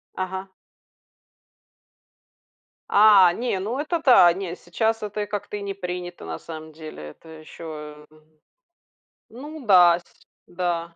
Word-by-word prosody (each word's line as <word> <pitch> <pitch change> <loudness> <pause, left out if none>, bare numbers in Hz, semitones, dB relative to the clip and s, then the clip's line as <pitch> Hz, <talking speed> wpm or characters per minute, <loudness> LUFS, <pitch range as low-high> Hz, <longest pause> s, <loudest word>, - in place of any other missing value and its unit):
Ага. 190 +1 -4 2.4
А, 200 -4 +6
не, 235 -4 -2
ну, 225 +7 -3
это 325 +3 -1
да, 190 - +7
не, 180 -2 -5
сейчас 220 +5 -2
это 210 0 -4
и - - -4
как-то 205 0 -5
и - - -7
не 200 -1 -4
принято 180 -2 -6
на 80 -1 -6
самом 160 -1 -9
деле. 155 - -10
Это 165 - -17
ещё 155 -1 -10
э 155 - -20 1.1
ну 290 +4 -10
да 180 -4 +6
с - - -22 0.4
Да. 170 -2 -3
180 Hz, 130 wpm, -23 LUFS, 165-210 Hz, 2.4 s, да